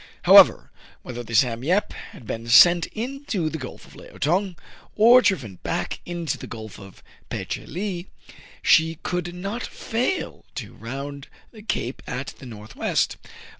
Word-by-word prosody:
However, - - +7 0.3
whether 120 -1 -6
the 115 -1 -5
"Sam 120 0 +2
Yep" 185 +8 +1
had 120 - -12
been 115 +2 -5
sent 170 +8 +7
into 230 - -3
the 160 - -4
Gulf 130 - -9
of - - -17
Leao - - -14
Tong, 180 +5 +1 0.4
or 235 +4 +7
driven 140 - 0
back - - -3
into 170 -4 -3
the - - -8
Gulf 110 -2 -9
of 95 -1 -14 0.3
Pe - - -4
che - - -5
lee, 185 +1 -4 0.6
she 160 0 +4
could 175 -1 -3
not 200 +7 -4
fail 245 +12 -3
to - - -6
round 140 +4 -7 0.2
the 220 - -13
cape 130 - -3
at 130 +2 -5
the 130 - -10
north 110 -1 -11
west. - - 0
165 Hz, 160 wpm, -24 LUFS, 120-195 Hz, 0.6 s, However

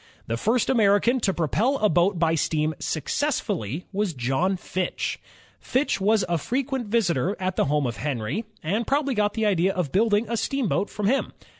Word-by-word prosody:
The 115 - -2
first 225 - +1
American 225 +1 +3
to 205 - +1
propel 205 - +1
a 215 - +3
boat 175 +3 +2
by 165 -1 +2
steam 155 0 0
success 280 - -1
fully 165 - -4
was 195 -4 -1
John 135 +10 0
Fitch, 180 0 -3 0.4
Fitch 260 -5 0
was 215 +1 +3
a 170 -1 0
frequent 260 - -2
visitor 195 - +1
at 185 0 -2
the - - +2
home 145 0 +1
of 120 -2 -3
Henry, 145 - -3 0.2
and 205 +9 -1
probably 280 -1 +1
got 210 -2 0
the 220 -1 0
idea 190 -2 +2
of 180 -7 -2
building 210 +2 +2
a 235 +1 -2
steamboat 230 -6 0
from 210 - -4
him. 260 +7 +1
200 Hz, 180 wpm, -25 LUFS, 165-230 Hz, 0.4 s, American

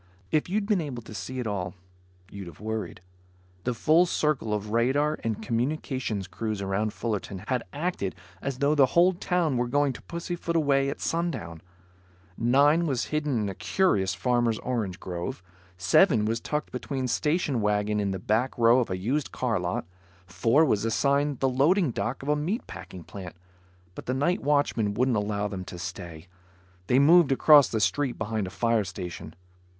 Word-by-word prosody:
If 155 +2 +1
you'd 205 +2 0
been 205 -4 +1
able 130 -6 -5
to 110 - -11
see 130 +4 -6
it 125 - -3
all, 100 -3 -3 0.6
you'd 100 -2 -8
have 85 - -12
worried. 110 -2 -4 0.6
The 125 -1 0
full 160 +9 +4
circle 150 -9 0
of 105 0 -2
radar 140 +7 +1
and 110 -2 -2
communications 120 -4 -2
crews 110 +2 -4
around 100 +2 -1
Fullerton 105 -4 -4
had 130 -2 +1
acted 145 - -3 0.3
as 135 -2 -3
though 140 +2 +2
the 140 -3 +5
whole 180 +2 +6
town 175 -6 0
were 120 0 0
going 145 +2 +1
to - - -11
pussyfoot 170 0 -4
away 140 -3 +2
at 140 - -6
sundown. 160 - -2 0.7
Nine 145 - +3
was 130 -4 0
hidden 150 -6 0
in 105 - -1
a 100 - -3
curious 95 - +1
farmer's 120 -2 +1
orange 110 -8 -3
grove. 90 0 -5 0.3
Seven 105 - +4
was 115 +2 0
tucked 150 +4 -3
between 130 +1 -3
station 150 -2 0
wagons 105 0 +1
in 100 - 0
the 95 - -2
back 110 +7 0
row 120 +1 +5
of 120 - -1
a 95 - -2
used 130 +10 -1
car 115 -6 -1
lot. 90 -1 -2 0.4
Four 115 - +3
was 110 -8 +1
assigned 140 +4 +1
the 135 - +3
loading 145 +5 +3
dock 125 +3 -3
of 140 - -4
a 150 - +4
meat 175 - -2
packing 90 -2 -9
plant, 90 0 -9 0.6
but - - -10
the 130 - 0
night 170 +7 +1
watchman 140 -8 +1
wouldn't 125 +2 +2
allow 105 0 -1
them 95 -2 -5
to 90 - -8
stay. 85 -1 -7 0.6
They 125 - +3
moved 155 +2 +6
across 145 0 +7
the 110 - -1
street 120 +7 0
behind 110 -2 -2
a - - -5
fire 115 +2 +1
station. 90 -4 -7
120 Hz, 175 wpm, -27 LUFS, 105-145 Hz, 0.7 s, across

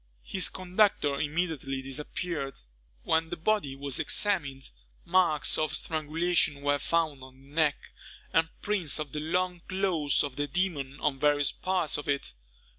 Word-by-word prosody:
His 185 -5 +2
conductor 185 -6 +1
immediately 150 -4 -2
disappeared. 140 - -3 0.4
When 160 0 +1
the - - -3
body 165 -6 0
was 140 -1 -1
examined, 145 -10 +1 0.3
marks 170 -7 +3
of 155 -1 +1
strangulation 155 -1 0
were 145 0 +1
found 155 -3 0
on 130 0 -14
the 135 - -19
neck, 150 -1 0 0.4
and 165 0 +3
prints 195 -8 +1
of 150 -3 -4
the 150 - -3
long 180 +3 -1
claws 185 -7 +1
of 140 -3 -5
the 145 0 -1
demon 145 -4 -2
on 135 -2 0
various 145 -1 +3
parts 185 -4 0
of 145 - -7
it. 140 -1 -1
155 Hz, 145 wpm, -29 LUFS, 140-175 Hz, 0.4 s, marks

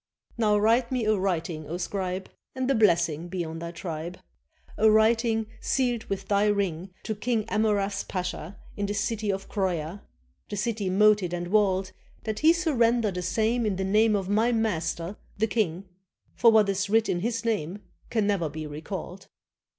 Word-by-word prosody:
/'Now 210 -2 +3
write 235 +4 +3
me 250 -3 0
a 215 0 +3
writing, 170 -5 -2
O 170 - -3
scribe, 185 +1 -3 0.3
And 260 +1 0
a - - +4
blessing 170 - +2
be 175 -1 -3
on 160 0 -6
thy 170 0 -5
tribe! 170 0 -6 0.6
A 220 - +4
writing 225 +1 +3
sealed 245 -4 0
with 195 -1 -4
thy 205 +1 +3
ring, 195 -4 0
To 220 - -2
King 220 +1 -1
Amurath's 205 -2 0
pasha 180 -1 -5 0.2
In 205 -1 -2
the 205 - -2
city 210 0 -1
of 195 0 -4
Croia, 180 -2 -2 0.5
The 205 - -4
city 210 -2 -1
moated 200 -2 +4
and 175 0 -4
walled, 190 -2 +2 0.3
That 215 -1 -3
he 315 +2 +6
surrender 240 - +2
the 180 -1 -4
same 220 +7 +1
In 210 -3 0
the 190 - -2
name 215 +3 +3
of 195 -2 -1
my 220 +4 +2
master, 180 -5 -1 0.2
the 215 - +2
king; 195 -4 -1 0.5
For 230 - +5
what 215 -2 +5
is 195 0 -1
writ 225 +1 +3
in 175 - 0
his 230 +4 -2
name 205 -3 -2 0.3
Can 220 -3 +1
never 195 -6 +1
be 155 +1 -6
recalled." 175 +5 -7
200 Hz, 175 wpm, -27 LUFS, 180-220 Hz, 0.6 s, he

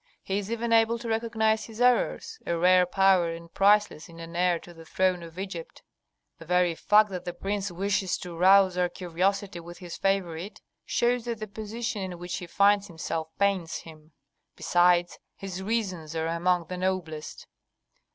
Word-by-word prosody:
He 195 +1 -1
is 205 +2 -6
even 230 0 -1
able 225 +1 +4
to 235 0 -8
recognise 220 -1 0
his 225 0 -11
errors, 250 - +1
a 170 - 0
rare 180 +1 +5
power 190 -2 +3
and 165 0 -11
priceless 205 -5 +3
in 165 0 -13
an 165 0 -9
heir 175 0 +2
to 175 +1 -13
the 165 -1 -13
throne 185 +2 0
of 165 0 -11
Egypt. 190 -4 -7 0.6
The 165 - -11
very 180 0 +2
fact 210 +5 +3
that 180 -2 -5
the 175 - -5
prince 200 +1 -2
wishes 195 +1 -1
to 175 -2 -8
rouse 190 +1 +5
our 180 0 +2
curiosity 185 +2 -2
with 170 +1 -10
his 175 -2 -8
favorite 195 -1 -2 0.3
shows 240 0 +1
that 235 -2 -3
the 215 - -4
position 215 +1 -5
in 185 -2 -5
which 175 +1 -5
he 180 - -7
finds 200 +2 +3
himself 160 -2 -4
pains 195 -4 0
him; 155 -1 -11 0.4
besides, 175 0 +2 0.2
his 190 -1 -6
reasons 190 -7 -3
are 160 0 -1
among 170 +1 +1
the 180 +3 -6
noblest." 180 -5 -3
185 Hz, 175 wpm, -27 LUFS, 170-205 Hz, 0.6 s, rare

